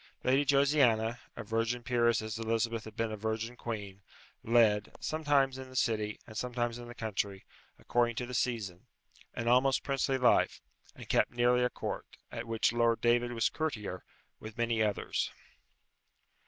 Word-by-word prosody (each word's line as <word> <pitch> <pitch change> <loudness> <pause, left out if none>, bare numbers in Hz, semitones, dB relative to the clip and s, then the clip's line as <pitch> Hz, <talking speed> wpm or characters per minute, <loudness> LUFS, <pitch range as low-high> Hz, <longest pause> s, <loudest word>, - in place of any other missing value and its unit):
Lady 135 +3 +3
Josiana, 135 -5 +3 0.2
a - - -6
virgin 115 +2 -1
peeress 120 -2 +2
as 110 0 -5
Elizabeth 115 0 -1
had 110 -1 -10
been 115 -1 -1
a - - -3
virgin 110 +3 -3
queen, 100 -5 -6 0.4
led 110 -3 +3
sometimes 145 -4 +1
in 130 0 -8
the 130 - -13
City, 110 -4 0
and 110 - -12
sometimes 120 0 -2
in 120 - -9
the 120 - -10
country, 100 -4 -3 0.3
according 120 -1 +1
to 125 - -2
the 125 - -8
season 105 -8 -2 0.5
an 115 - -3
almost 130 +2 +4
princely 135 -1 0
life, 125 -1 +3 0.4
and - - -11
kept - - +3
nearly 125 +1 +3
a 125 - +2
court, - - -5 0.2
at 115 +1 -5
which 115 0 +1
Lord 115 -1 +2
David 120 +1 +2
was 115 -1 +2
courtier, 105 - -3 0.4
with 110 0 -9
many 115 -1 +1
others. 105 -2 0
120 Hz, 160 wpm, -31 LUFS, 110-125 Hz, 0.5 s, almost